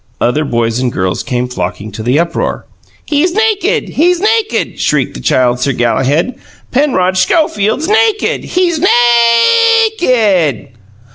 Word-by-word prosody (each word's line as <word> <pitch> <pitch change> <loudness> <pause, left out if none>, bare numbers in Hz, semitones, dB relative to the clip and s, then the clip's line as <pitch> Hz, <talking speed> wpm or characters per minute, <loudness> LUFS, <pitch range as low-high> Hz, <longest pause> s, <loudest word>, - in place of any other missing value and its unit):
Other 145 +6 0
boys 115 -3 -1
and 125 -1 -1
girls 95 -3 -2
came 125 -2 -3
flocking 105 -3 -5
to 110 - -8
the 125 +5 0
uproar. 170 +1 -2 0.4
"He's 315 +4 0
nakid, 435 -1 0
he's 350 +3 +1
nakid!" 435 +2 -1
shrieked - - 0
the - - -8
Child 125 -1 +1
Sir 140 +2 0
Galahad. 135 - 0 0.3
"Penrod 215 -10 +1
Schofield's 220 - 0
nakid! 435 0 0
He's 350 -3 0
NA - - +2
A 240 - +4
A 440 0 -4
KID!" 200 - +1
220 Hz, 140 wpm, -12 LUFS, -, 0.4 s, A